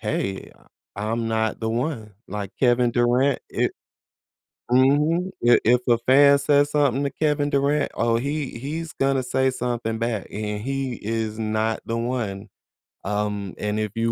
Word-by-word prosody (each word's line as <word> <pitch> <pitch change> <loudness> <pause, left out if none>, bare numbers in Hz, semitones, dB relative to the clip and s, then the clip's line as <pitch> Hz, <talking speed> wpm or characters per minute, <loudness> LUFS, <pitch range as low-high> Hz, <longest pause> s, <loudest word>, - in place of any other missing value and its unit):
"Hey, 95 0 -3 0.5
I'm 115 +2 -2
not 110 0 -1
the 110 - -1
one." 115 -3 -3
Like, 100 -2 -5
Kevin 120 -1 +3
Durant, 125 +3 +2
it - - 0 1.0
Mhm. 150 +8 +3 0.2
I 120 - +7
if 120 +2 +4
a 120 - +5
fan 140 +4 +5
says 145 0 +3
something 140 -3 +2
to 140 - -1
Kevin 150 -1 0
Durant, 140 +1 +1
oh, 115 0 +1
he 140 -1 -3
he's 160 +5 -5
gonna 135 -1 +1
say 130 +1 +1
something 120 -3 -3
back, 115 -3 -2
and 105 0 -4
he 135 -1 -2
is 110 0 -2
not 110 0 -1
the 115 - -2
one, 115 -4 -3 0.6
um, 105 -1 -2
and 105 0 -1
if 105 -2 -2
you 115 0 0
120 Hz, 155 wpm, -23 LUFS, 110-140 Hz, 1.0 s, I